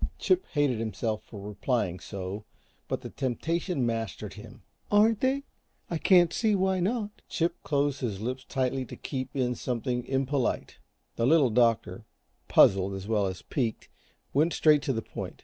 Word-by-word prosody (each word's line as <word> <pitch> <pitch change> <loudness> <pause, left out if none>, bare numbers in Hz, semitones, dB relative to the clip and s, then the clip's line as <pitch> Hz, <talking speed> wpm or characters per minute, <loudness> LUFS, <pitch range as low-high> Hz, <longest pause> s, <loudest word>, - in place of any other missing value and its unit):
Chip 370 0 +2
hated 145 -7 +2
himself 110 0 -2
for 105 - -10
replying 100 -2 -1
so, 100 +2 -6 0.4
but - - -2
the - - -8
temptation 155 +3 -1
mastered 115 -2 -3
him. - - -12 0.3
"Aren't 210 +1 +4
they? 270 +2 +1 0.5
I 165 - -1
can't 175 -2 +5
see 220 -3 +2
why 190 -1 +1
not." 210 +2 -2
Chip 170 0 -1
closed 145 -1 0
his 110 -7 -2
lips 130 +4 -3
tightly 130 0 -1
to - - -9
keep 130 0 -5
in 125 -2 +1
something 125 0 -2
impolite. 135 -1 -1 0.4
The 115 - +2
Little 145 -4 +5
Doctor, 115 0 +2 0.4
puzzled 95 0 +5
as 95 +1 -7
well 105 -3 +2
as 95 -1 -6
piqued, 120 -6 -2 0.4
went 155 +5 +3
straight 150 -2 +5
to 135 - -1
the 115 -2 -3
point. - - -7
130 Hz, 160 wpm, -28 LUFS, 115-165 Hz, 0.5 s, can't